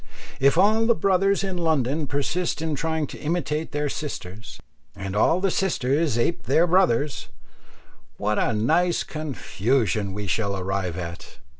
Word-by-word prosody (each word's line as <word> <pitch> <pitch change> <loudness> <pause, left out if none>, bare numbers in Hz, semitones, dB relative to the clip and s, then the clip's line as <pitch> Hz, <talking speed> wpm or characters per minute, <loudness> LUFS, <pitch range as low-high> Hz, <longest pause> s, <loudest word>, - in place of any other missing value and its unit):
If 140 +4 +4
all 215 +4 +4
the 235 - +4
brothers 195 +2 +2
in 190 -2 -3
London 155 -2 0
persist 145 +6 -1
in 160 -1 -2
trying 160 +1 -1
to - - -10
imitate 155 -1 -2
their 150 0 -1
sisters, 115 -9 -6 0.4
and 95 -1 -5
all 160 - +3
the 195 0 +1
sisters 150 -7 0
ape 120 +8 -1
their 165 - +4
brothers, 150 -7 +2 0.9
what 105 +1 0
a - - +1
nice 160 +11 +2
confusion 120 - -1
we 105 +1 -4
shall 100 +1 -1
arrive 95 -2 -2
at! 85 -1 -7
150 Hz, 145 wpm, -24 LUFS, 105-170 Hz, 0.9 s, If